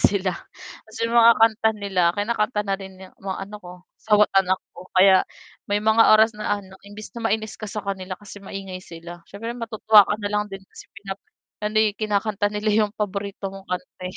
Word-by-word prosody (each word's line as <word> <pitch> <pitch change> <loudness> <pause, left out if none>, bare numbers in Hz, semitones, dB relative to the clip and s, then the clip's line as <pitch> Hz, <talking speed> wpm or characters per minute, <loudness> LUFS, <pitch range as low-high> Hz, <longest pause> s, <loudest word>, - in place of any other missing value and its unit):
sila, 195 -2 +2 0.5
tapos 220 0 -14
'yong 230 +1 0
mga 230 0 +8
kanta 220 0 +4
nila 200 -3 -1
kinakanta 210 +1 0
na 195 - 0
rin 190 0 -9
ng 185 - -17
mga 190 -1 -4
ano 210 - -8
ko, 180 -2 -11 0.3
asawa't 210 -1 +3
anak 190 -1 +4 0.2
ko 185 - -12
kaya 190 0 +6 0.4
may 205 - +1
mga 220 +1 +5
oras 220 +1 +4
na 210 - -4
ano 190 -1 -15
imbis 210 +1 -10
na 230 -1 -2
mainis 215 0 -1
ka 215 - -5
sa 210 +1 -5
kanila 190 -1 -4
kasi 205 0 -11
maingay 190 -1 -7
sila 170 0 -10
siyempre 225 +4 -6
matutuwa 220 -2 +5
ka - - +1
nalang 210 0 -1
din 195 0 -7
kasi - - -15 0.7
ano, 210 +1 -2
eh, 215 -1 +4
kinakanta 210 -1 0
nila 210 +1 -1
'yong 205 - -6
paborito 200 -1 -4
kong 195 0 -11
kanta 180 0 -6
eh. 185 - -10
205 Hz, 195 wpm, -23 LUFS, 195-215 Hz, 0.7 s, mga